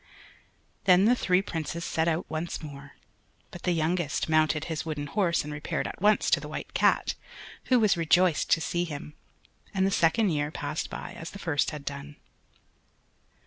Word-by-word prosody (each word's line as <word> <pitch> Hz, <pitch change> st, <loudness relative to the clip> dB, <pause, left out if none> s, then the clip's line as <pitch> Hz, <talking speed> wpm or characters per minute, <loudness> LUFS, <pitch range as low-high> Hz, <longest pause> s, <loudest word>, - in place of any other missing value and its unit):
Then 185 Hz, +1 st, +6 dB
the 235 Hz, -, +6 dB
three 185 Hz, -5 st, +2 dB
Princes 170 Hz, -1 st, -4 dB
set 160 Hz, +1 st, 0 dB
out 165 Hz, +1 st, 0 dB
once 160 Hz, +2 st, -4 dB
more, 140 Hz, -2 st, -9 dB, 0.6 s
but 175 Hz, -, -9 dB
the 180 Hz, -, 0 dB
youngest 165 Hz, -1 st, 0 dB
mounted 155 Hz, -1 st, +2 dB
his 160 Hz, -2 st, -3 dB
wooden 150 Hz, -2 st, -4 dB
horse 170 Hz, +2 st, +1 dB
and 150 Hz, 0 st, -6 dB
repaired 150 Hz, 0 st, -3 dB
at -, -, -8 dB
once 210 Hz, +1 st, +3 dB
to -, -, +5 dB
the -, -, -8 dB
White -, -, -6 dB
Cat, -, -, +3 dB, 0.5 s
who 255 Hz, -1 st, +4 dB
was 215 Hz, -4 st, +4 dB
rejoiced 170 Hz, 0 st, +3 dB
to 165 Hz, -, +4 dB
see 175 Hz, +2 st, -1 dB
him, 150 Hz, -2 st, -6 dB, 0.6 s
and 190 Hz, 0 st, +3 dB
the 195 Hz, -, +1 dB
second 195 Hz, +4 st, +3 dB
year 145 Hz, -1 st, 0 dB
passed 155 Hz, 0 st, -4 dB
by -, -, -6 dB
as 165 Hz, -, -7 dB
the -, -, -9 dB
first 160 Hz, -7 st, 0 dB
had 150 Hz, -2 st, -8 dB
done. 140 Hz, +1 st, -6 dB
165 Hz, 180 wpm, -28 LUFS, 150-180 Hz, 0.6 s, Then